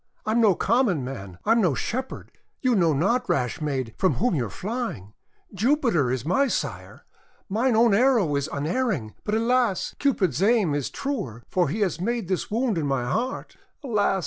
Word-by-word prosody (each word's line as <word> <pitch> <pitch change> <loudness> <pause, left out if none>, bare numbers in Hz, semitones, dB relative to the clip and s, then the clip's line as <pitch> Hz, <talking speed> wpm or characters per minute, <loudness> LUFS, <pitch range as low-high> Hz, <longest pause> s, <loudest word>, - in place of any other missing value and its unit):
I 215 - 0
am 235 +2 +3
no 205 -5 +5
common 205 - +1
man! 100 -9 -7
I 220 - +2
am 230 0 +4
no 170 -9 +2
Shepherd! 255 - -4 0.3
You 255 -2 +2
know 175 -7 +3
not, 230 - +1
rash 125 +2 0
maid, 130 -6 -2
from 185 - +2
whom 245 +1 +1
you 125 -8 0
are - - -10
flying! 205 - -5 0.4
Jupiter 225 - +2
is 130 0 -2
my 275 - +2
sire. - - -4 0.4
Mine 230 +4 +1
own 230 -1 +5
arrow 220 - +3
is 140 +2 -1
unerring; 155 - -1
but, 210 - -1
alas! 230 -3 +1
Cupid's 190 - +1
aim 205 -6 +3
is 145 -2 -1
truer, 210 - -4
for 180 -5 +2
he 205 +9 -2
has 180 -4 0
made 230 -2 -2
this 185 - -1
wound 225 -4 0
in 150 - -1
my 135 -3 0
heart! 240 - -3 0.3
Alas! 205 -6 +1
200 Hz, 185 wpm, -25 LUFS, 145-240 Hz, 0.4 s, no